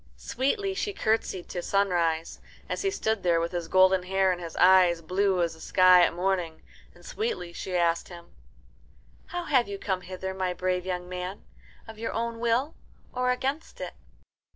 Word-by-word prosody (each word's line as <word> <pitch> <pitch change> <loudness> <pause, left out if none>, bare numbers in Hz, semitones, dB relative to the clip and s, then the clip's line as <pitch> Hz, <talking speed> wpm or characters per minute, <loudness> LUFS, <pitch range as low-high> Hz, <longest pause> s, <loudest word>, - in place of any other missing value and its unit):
Sweetly 390 - -1
she 405 +1 -3
curtsied 220 - -1
to 175 - -4
Sunrise, 175 -5 0 0.3
as - - -3
he 390 - +1
stood 220 - -1
there 170 -2 +2
with 170 +1 -2
his 175 -2 -3
golden 185 +1 +4
hair 190 +1 +1
and 180 -1 -3
his 165 -1 -7
eyes 180 -2 +5
blue 185 +2 +1
as 170 - -1
the 160 - -15
sky 185 +1 +6
at - - +3
morning, 175 -2 -2 0.3
and - - -18
sweetly 430 - -3
she 185 +1 -5
asked 170 -1 +1
him, 170 -1 -12 0.9
"How 355 0 -4
have 260 -9 +2
you 200 0 -5
come 190 -2 -2
hither, 190 +1 -6
my 185 -1 -2
brave 185 0 -1
young 180 -1 -3
man 180 +2 -6 0.4
of 220 -1 -11
your 230 - -3
own 230 0 -3
will 235 +6 +1 0.4
or 250 0 0
against 270 +5 -2
it?" - - -5
185 Hz, 175 wpm, -27 LUFS, 175-225 Hz, 0.9 s, sky